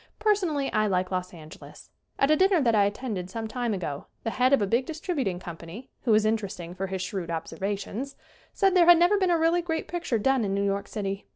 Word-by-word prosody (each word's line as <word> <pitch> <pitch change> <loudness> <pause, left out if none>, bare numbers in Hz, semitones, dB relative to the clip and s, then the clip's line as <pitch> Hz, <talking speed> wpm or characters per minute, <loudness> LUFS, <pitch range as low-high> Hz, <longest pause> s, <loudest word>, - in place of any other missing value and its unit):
Per 425 0 +4
sonally 315 -9 -2
I 215 0 +2
like 185 -1 0
Los 185 0 -2
Angeles. 155 -3 -13 0.3
At 275 +2 +3
a - - +6
dinner 375 +1 +4
that 240 -5 +2
I 205 -2 +4
attended 205 -3 -3
some 225 +3 -4
time 240 +1 -2
ago 165 -8 -4 0.2
the 225 - -2
head 255 +2 +2
of 275 - +5
a 205 - +1
big 235 +6 0
dis 320 -1 -6
tributing 260 - -2
company, 170 +7 -9
who 230 - +4
is 215 0 +3
interesting 200 -6 -2
for 190 +1 -4
his 190 -1 -3
shrewd 180 -2 -4
observations, 195 +10 -4 0.4
said 390 -2 +2
there 345 -2 +5
had 350 -1 +9
never 355 +4 +4
been 375 -2 +2
a 345 - +3
really 330 +2 +2
great 325 -2 -3
picture 345 -9 -2
done 265 +3 +2
in 195 -1 -1
New 200 0 0
York 200 0 -1
City. 195 -1 -4
220 Hz, 230 wpm, -26 LUFS, 190-310 Hz, 0.4 s, had